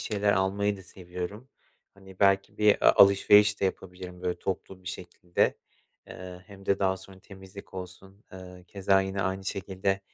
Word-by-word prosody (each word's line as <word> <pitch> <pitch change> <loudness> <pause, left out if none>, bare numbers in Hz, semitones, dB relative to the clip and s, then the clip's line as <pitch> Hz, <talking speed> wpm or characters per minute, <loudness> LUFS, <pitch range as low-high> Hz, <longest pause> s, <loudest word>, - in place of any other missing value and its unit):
şeyler 105 -1 0
almayı 100 +2 0
da 95 - -12
seviyorum. 90 +7 -8 0.5
Hani, 95 -1 -16
belki 100 +1 +2
bir 105 -1 +4
a - - +7
alışveriş 105 +1 +6
de - - +1
yapabilirim, 90 -1 -5
böyle, 90 -1 -2
toplu 95 0 -5
bir 90 - -7
şekilde. 90 -1 -2 0.5
Eee, 90 -1 -10
hem 100 -2 -14
de 100 - +2
daha 95 -1 +1
sonra 95 0 -13
temizlik 95 0 -13
olsun, 95 +2 -10
eee, 90 -1 -11
keza 95 0 +2
yine 95 0 -2
aynı 95 +1 -3
şekilde 95 0 -2
95 Hz, 160 wpm, -28 LUFS, 90-100 Hz, 0.5 s, a